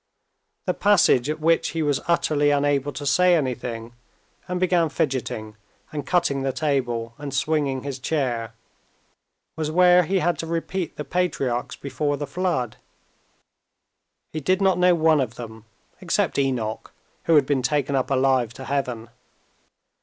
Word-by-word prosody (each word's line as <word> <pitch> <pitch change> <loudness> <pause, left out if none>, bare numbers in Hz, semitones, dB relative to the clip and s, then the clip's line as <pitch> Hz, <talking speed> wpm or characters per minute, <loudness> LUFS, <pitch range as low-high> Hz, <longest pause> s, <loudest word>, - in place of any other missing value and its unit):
The - - +1
passage 170 -10 +3
at 155 +1 -2
which 165 +2 +2
he 160 - +1
was 145 -2 0
utterly 150 -3 +2
unable 145 -1 +1
to 145 - -7
say 180 +5 +4
anything, 120 -5 -3 0.5
and 180 0 -2
began 180 -3 +2
fidgeting 120 -7 -3 0.4
and 145 -3 -5
cutting 170 -6 +1
the 135 0 0
table 125 -5 -1
and 145 -1 -6
swinging 135 -1 0
his 140 -2 -5
chair, 120 -6 -2 1.0
was 155 -1 -2
where 180 +2 +6
he 190 +3 0
had 175 -1 0
to 165 - -4
repeat 170 +2 -3
the 150 - -5
patriarchs 135 -7 -1
before 145 +1 -2
the 145 - -3
Flood. 145 -6 -2 1.6
He 155 - -2
did 185 +6 +1
not 190 -2 +2
know 180 0 +5
one 160 -2 +3
of 120 -3 -3
them, 110 -2 -9 0.3
except 185 -2 0
Enoch, 125 -6 -2 0.3
who 165 - +4
had 145 -3 +5
been 135 -1 +1
taken 140 +1 0
up 130 - 0
alive 130 -3 +2
to 130 - -8
heaven. 125 -5 -2
145 Hz, 150 wpm, -23 LUFS, 130-165 Hz, 1.6 s, where